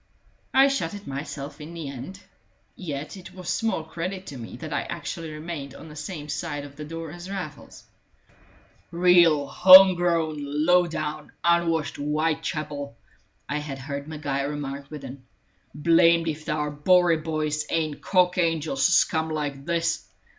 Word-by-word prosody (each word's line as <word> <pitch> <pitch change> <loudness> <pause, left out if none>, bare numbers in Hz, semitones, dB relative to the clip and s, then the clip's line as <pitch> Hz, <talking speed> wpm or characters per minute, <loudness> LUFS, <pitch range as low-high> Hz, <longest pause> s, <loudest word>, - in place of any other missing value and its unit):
I 270 +1 +6
shut 205 -10 -1
it 205 0 -10
myself 140 +1 -6
in 160 +3 -9
the 165 -3 -5
end. 140 +9 -8 0.5
Yet 150 -3 -6
it 185 0 -12
was 185 -2 -7
small 220 -8 -1
credit 180 +4 -5
to 140 - -8
me 115 - -8
that - - -6
I - - 0
actually 165 -2 -6
remained 150 -3 -6
on 160 - -11
the 150 - -11
same 155 -1 -6
side 150 -1 -4
of 140 0 -12
the 150 - -7
door 165 +1 -6
as 175 +3 -9
Raffles. 180 -7 -7 1.1
"Reel 170 -4 +5
home 185 +6 +9
grown, 170 -3 0
low 155 +5 +2
down, 155 -2 -5
unwashed 170 -2 +1
Whitechapel!" 150 -2 -2 0.5
I 150 +3 -2
had 145 -2 -6
heard 140 +2 -6
Maguire 145 -3 -2
remark 140 -1 -5
within. 140 -3 -9 0.5
"Blamed 165 +2 +4
if 155 +1 -4
our 150 -1 -1
Bowery 175 +3 +4
boys 155 -1 -2
ain't 155 -3 -1
cock 180 -1 +2
angels 160 -5 0
to - - -1
scum 160 -1 +3
like 145 -3 -4
this. 170 0 -1
155 Hz, 155 wpm, -25 LUFS, 145-170 Hz, 1.1 s, home